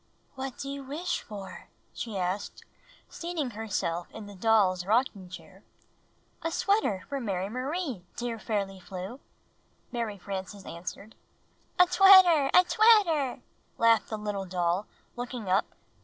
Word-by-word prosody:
"What 265 -2 -6
do 275 - -6
you 280 0 -5
wish 320 +7 -3
for?" 200 -3 -9 0.3
she 220 -4 -5
asked, 185 +2 -3 0.4
seating 335 -7 -4
her 220 +1 -6
self 175 -3 -2
in 220 - -9
the 205 - -10
doll's 190 -3 +3
rocking 205 -2 0
chair. 185 +2 -12 0.8
''A 330 0 -2
sweater 395 - +1
for 280 - -3
Mary 195 -5 -2
Marie, 260 - -3
dear 235 -2 -4
Fairly 200 -4 -3
Flew," 190 +7 -7 0.7
Mary 230 -4 -3
Frances 195 +1 -6
answered. 180 +5 -8 0.6
''A 360 - +8
twetter! 370 -7 +8
A 360 - +7
twetter!" 365 - +4 0.4
laughed 230 -1 +4
the 220 - -3
little 205 -2 -3
doll, 180 +2 0 0.3
looking 245 -3 -5
up. 190 +3 +2
220 Hz, 135 wpm, -28 LUFS, 195-275 Hz, 0.8 s, A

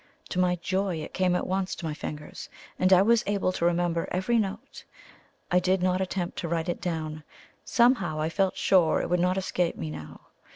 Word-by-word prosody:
To 185 - -2
my 180 -1 +3
joy 185 +1 -1
it 155 - -7
came 185 -1 +2
at - - -1
once 190 0 -1
to 170 - -7
my 155 - -2
fingers, 150 0 -7 0.3
and 185 +1 +3
I 185 0 +7
was 230 +2 +4
able 200 -2 +1
to 170 - -2
remember 170 -1 +1
every 210 +6 +1
note. 205 +1 -5 0.7
I 180 - +5
did 185 0 +1
not 185 0 +1
attempt 185 -1 -3
to 170 - -3
write 165 +1 -1
it 175 - -3
down 155 -3 -3 0.4
somehow 235 -11 +2
I 155 - 0
felt 190 +3 0
sure 175 -5 +3
it - - -3
would 180 - +3
not 180 +2 +1
escape 180 -2 -1
me 80 -1 -5
now. 80 0 -9
180 Hz, 205 wpm, -27 LUFS, 170-190 Hz, 0.7 s, I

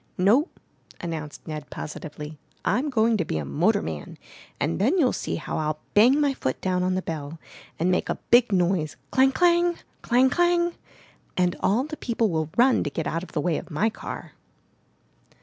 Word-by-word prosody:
"No," 225 - +4 0.5
announced 160 -4 -6
Ned 150 -2 -6
positively, 150 0 -7 0.3
"I'm 250 - +1
going 225 -3 +2
to 175 - 0
be 80 - -3
a 75 - -3
motorman, 75 +2 -1 0.4
and 165 +5 -1
then 270 - +3
you'll 270 -8 +3
see - - -3
how - - -4
Til 155 0 -2
bang 245 +8 +6
my 285 -2 +2
foot 130 - -3
down 185 -1 0
on 185 0 +1
the 185 - -2
bell 155 -1 -5 0.4
and 175 +3 +1
make 180 - 0
a - - 0 0.2
big 240 -1 +6
noise, 175 -4 +1
clang, 265 0 +4
clang! 345 +2 +3 0.2
clang, 255 +2 +3
clang! 345 +1 +2 0.6
and 180 -1 +2
all 225 +6 +2
the 305 +2 -6
people 230 -4 0
will 160 -1 -1
run 250 +2 +4
to - - -2
get 155 +2 -4
out 165 - -1
of 185 - -11
the 150 - 0
way 165 0 0
of - - -12
my 210 +9 +1
car!" - - -7
185 Hz, 185 wpm, -25 LUFS, 155-260 Hz, 0.6 s, bang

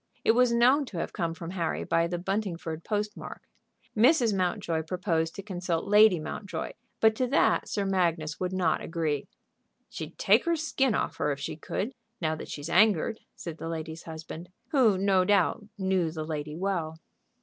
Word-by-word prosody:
It - - +7
was 245 +1 +4
known 255 +5 +4
to 200 - -8
have - - -3
come 165 -1 -2
from 170 0 -7
Harry 175 -3 -2
by 165 0 +2
the 175 +1 -3
Buntingford 175 -4 -3
post 210 +1 -2
mark. - - -9 0.5
Mrs. 235 -1 +4
Mountjoy 175 -3 0
proposed 165 -1 -1
to 195 - -6
consult 180 -4 -2
Lady 210 -3 +6
Mountjoy; 190 +5 -5 0.3
but 220 0 +5
to 255 - +1
that 275 +5 +2
Sir 200 -2 -1
Magnus 170 -5 0
would 185 0 -1
not 180 -4 +1
agree. 155 -4 -2 0.6
"She'd - - -7
take - - +4
her 340 0 +2
skin 270 -6 +1
off - - -2
her 150 - 0
if 140 - -3
she 140 - -4
could, 200 +8 -3 0.3
now 155 -2 0
that - - -8
she's 145 +1 -5
angered," 210 +3 +3 0.2
said 165 -2 -7
the 165 - -5
lady's 160 0 -5
husband, 160 +1 -8 0.2
who 240 - +4
no 190 -1 +3
doubt 205 +2 +2
knew 190 -3 +1
the 155 -1 -5
lady 150 -1 -4
well. 170 -3 -2
180 Hz, 180 wpm, -28 LUFS, 165-210 Hz, 0.6 s, It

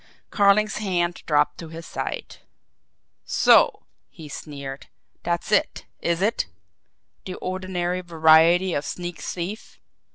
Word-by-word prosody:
Carling's 205 +1 +3
hand 175 -4 -1
dropped 150 -1 +2
to 165 - -7
his 165 +1 -9
side. - - -5 0.9
"So!" - - +4 0.3
he 160 - -12
sneered. 140 -2 -8 0.3
"That's 170 +3 -2
it, - - +1
is 170 +2 0
it! 215 - 0 0.8
The 185 - -5
ordinary 185 -1 -3
variety 165 +2 +4
of 145 - -1
sneak 175 +2 -5
thief!" 185 +5 -6
175 Hz, 110 wpm, -24 LUFS, 160-185 Hz, 0.9 s, So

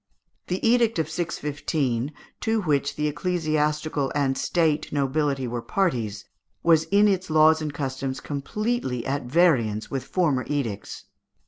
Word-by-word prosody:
The 185 +5 0
edict 230 -2 +3
of 160 -1 -1
615, 145 -6 -2 0.3
to 225 -1 0
which 145 -4 0
the 150 - 0
ecclesiastical 150 -3 -1
and 135 -2 +1
State 160 -2 0
nobility 140 -1 0
were 120 0 -3
parties, 115 - -1 0.4
was 160 -2 +4
in 200 +5 +4
its 190 -3 0
laws 155 0 +5
and 155 -1 -2
customs 135 -2 -3
completely 145 - -2
at 140 -1 -2
variance 125 -8 +2
with 135 -2 -2
former 150 -8 +1
edicts. 120 -9 -3
150 Hz, 130 wpm, -25 LUFS, 135-170 Hz, 0.4 s, laws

